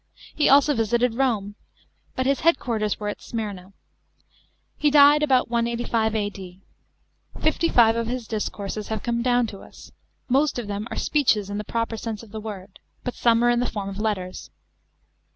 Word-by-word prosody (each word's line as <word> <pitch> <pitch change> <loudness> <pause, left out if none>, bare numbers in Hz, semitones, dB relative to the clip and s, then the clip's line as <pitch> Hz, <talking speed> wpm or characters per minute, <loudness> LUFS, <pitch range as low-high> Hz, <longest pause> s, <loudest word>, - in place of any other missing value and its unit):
He 300 - +3
also 285 +2 +5
visited 235 0 +1
Rome. 225 -6 0 0.6
But 260 - -1
his 275 0 +1
head 335 +2 +4
quarters 215 -4 -2
were 210 - -4
at 205 - -5
Smyrna. 200 -5 -6 1.0
He 300 - +2
died 290 +1 +6
about 260 -5 +2
185 235 -1 0
A.D. 195 -3 -5 0.8
Fifty 320 +2 +1
five 225 -2 +5
of 230 -1 -2
his 245 -1 -4
discourses 210 -1 -4
nave 220 - -3
come 235 -1 -1
down 245 0 +2
to 205 -3 -8
us; - - -14 0.4
most 275 +3 +2
of 240 - -3
them 205 +2 -4
are - - -6
speeches 220 -9 +1
in 205 - -3
the - - -4
proper 230 +1 -3
.sense 220 -1 -5
of 220 - -15
the 220 0 -6
word, 200 -3 -9 0.2
but 250 - -3
some 235 0 +2
are 240 - +4
in 240 - +1
the 245 - 0
form 200 -3 -4
of 195 +1 -7
letters. 190 -4 -3
230 Hz, 180 wpm, -24 LUFS, 210-250 Hz, 1.0 s, died